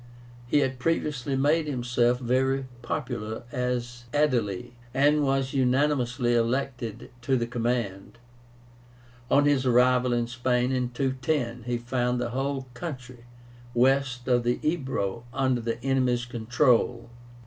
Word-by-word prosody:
He 145 +4 +3
had 130 -2 -1
previously 145 -3 -1
made 150 +4 +2
himself 120 -2 +1
very 130 +2 +1 0.2
popular 120 -5 -4
as 120 -1 -3
Aedile, 120 -7 +1 0.2
and 145 +2 +4
was 135 -1 0
unanimously 130 -2 +1
elected 120 -1 -1
to 130 +2 +1
the 120 - 0
command. 115 -4 -2 1.1
On 145 +1 +4
his 145 -3 +3
arrival 125 0 +4
in 120 -1 +1
Spain 125 +1 0
in 125 -2 0
210, 130 -1 -2
he 120 -1 0
found 125 +1 -1
the 120 -1 -2
whole 135 +1 -2
country 125 -4 -7 0.5
west 130 0 +2
of 125 -1 +3
the 120 +1 0
Ebro 130 - -1
under 130 -1 +1
the 115 0 -3
enemy's 130 -2 +1
control. 120 0 +1
125 Hz, 125 wpm, -27 LUFS, 120-135 Hz, 1.1 s, and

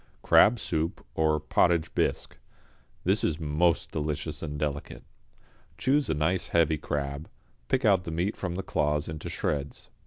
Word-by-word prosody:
=Crab 115 +3 +6
Soup, 80 -3 -2
or 80 -1 +2
Potage 80 +2 +2
Bisque.= - - -1 0.7
This 95 +4 +1
is 80 0 0
most 85 +2 +1
delicious 75 0 -3
and 75 -2 -4
delicate. 75 -1 -4 0.7
Choose 140 +2 +1
a - - +1
nice 80 +5 0
heavy 80 -2 +2
crab, 70 0 -4 0.4
pick 130 - +1
out 95 -4 +4
the - - -4
meat 85 +6 -1
from 90 -2 -4
the 95 - -3
claws 75 -3 0
into 80 -1 -6
shreds. 70 -1 -3
80 Hz, 150 wpm, -28 LUFS, 75-90 Hz, 0.7 s, =Crab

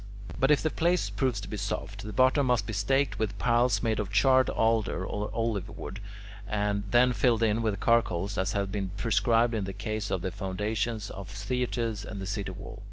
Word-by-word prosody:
But 135 - +3
if 150 -2 +4
the 155 - +1
place 175 +2 +1
proves 130 -6 0
to - - -7
be 105 - -5
soft, 100 0 -4
the 105 - -6
bottom 130 +5 +3
must 120 -5 +2
be 115 - -5
staked 135 +8 +1
with 105 -2 -2
piles 120 +1 +2
made 110 -2 +1
of 100 -2 -3
charred 130 +4 +4
alder 110 -4 +1
or 105 +2 -3
olive 115 -4 -2
wood, 95 - -7 0.5
and 105 0 -1
then 125 +2 +4
filled 115 +1 +2
in 110 0 +2
with 105 -4 -1
charcoal 105 -7 +2
as 95 +1 -1
has 100 -1 0
been 95 -1 -3
prescribed 115 +3 +2
in 105 -3 -1
the 95 - -5
case 105 +1 -3
of 90 -2 -2
the 95 - -2
foundations 105 +3 -2
of 95 -1 -8
theatres 115 +1 -2
and 100 0 -7
the 95 - -4
city 100 0 -3
wall. 100 +3 -9
105 Hz, 205 wpm, -28 LUFS, 100-120 Hz, 0.5 s, if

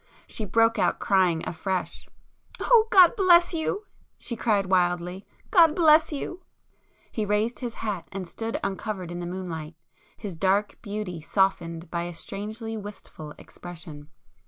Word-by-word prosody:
She 215 - -4
broke 225 +3 +3
out - - +2
crying 185 -4 +2
afresh. 185 +2 -3 0.5
"Oh 455 -3 +5
God 365 -2 +7
bless 350 -4 +5
you!" 365 +6 -2 0.3
she 235 - -4
cried 210 -4 +1
wildly—"God 185 - +2
bless 315 -1 +5
you!" 350 +5 -5 0.7
He 220 - -2
raised 210 +3 0
his 240 -3 -5
hat 205 -6 -4
and 190 -2 -5
stood 225 +5 -4
uncovered 195 -2 -4
in 175 - -5
the 175 - -4
moonlight, 170 -4 -6 0.4
his 195 -5 -6
dark 195 +4 +1
beauty 205 -6 -5
softened 170 -2 0
by 170 - -1
a 175 -1 -7
strangely 215 +6 -6
wistful 200 -7 -9
expression. 160 -4 -11
200 Hz, 135 wpm, -26 LUFS, 175-230 Hz, 0.7 s, God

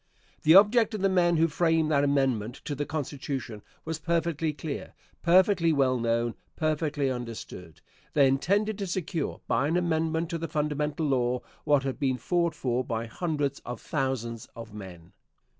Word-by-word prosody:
The 160 +3 +6
object 215 +3 +6
of 210 - -4
the 195 - +4
men 175 -2 +3
who 165 +1 +4
framed 160 -1 +1
that 140 -2 +3
amendment 130 -6 +1
to 150 - -2
the 145 +1 -3
Constitution 135 -6 -4 0.2
was 160 0 -3
perfectly 165 -2 0
clear, 150 0 -6 0.3
perfectly 180 -1 +4
well 130 -4 +2
known, 115 0 0 0.2
perfectly 150 -3 0
understood. 115 -9 -7 0.3
They 140 -2 +5
intended 200 +10 +1
to 200 - -2
secure, 175 -2 -3
by 140 - +2
an 165 +3 +1
amendment 165 -1 0
to 165 - -2
the 165 - -3
fundamental 150 0 -1
law, 125 -3 +1 0.2
what 145 -3 +3
had 135 0 -3
been 130 -3 +1
fought 170 +5 0
for 125 -3 -1
by 115 -2 -3
hundreds 145 +2 -2
of 120 -1 -7
thousands 125 -5 -3
of 115 -2 -9
men. 90 -5 -10
150 Hz, 160 wpm, -28 LUFS, 130-165 Hz, 0.3 s, The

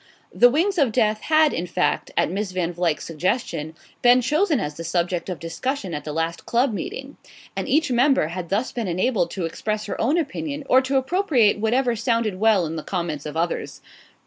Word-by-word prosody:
"The 245 - +6
Wings 345 +8 +1
of 270 -6 +3
Death" 215 -2 +1
had, 310 -1 +3
in 175 +2 -3
fact, 180 +1 0
at - - +2
Miss 195 0 -3
Van 175 -1 -1
Vluyck's 170 -3 -1
suggestion, 165 - -2 0.3
been 245 +1 +6
chosen 300 - +1
as 150 0 -3
the 165 - -8
subject 175 +2 -1
of 180 - -3
discussion 190 +4 -4
at 145 -1 -5
the 150 - -4
last 165 +2 -3
club 240 +1 +2
meeting, 385 - -6 0.4
and - - -3
each 300 -1 +2
member 250 - +3
had 175 -1 -6
thus 210 +6 0
been 235 -4 -3
enabled 185 0 0
to 180 -1 -3
express 215 +6 -3
her - - -4
own 280 +9 +2
opinion 295 -1 -3
or 260 - +5
to 270 +1 0
appropriate 265 - +2
whatever 240 +3 +1
sounded 230 -4 0
well 215 -4 +4
in 160 +1 -4
the - - -3
comments 165 -6 -3
of 150 - -7
the 165 - +1
others. 170 0 -3
215 Hz, 200 wpm, -23 LUFS, 170-260 Hz, 0.4 s, The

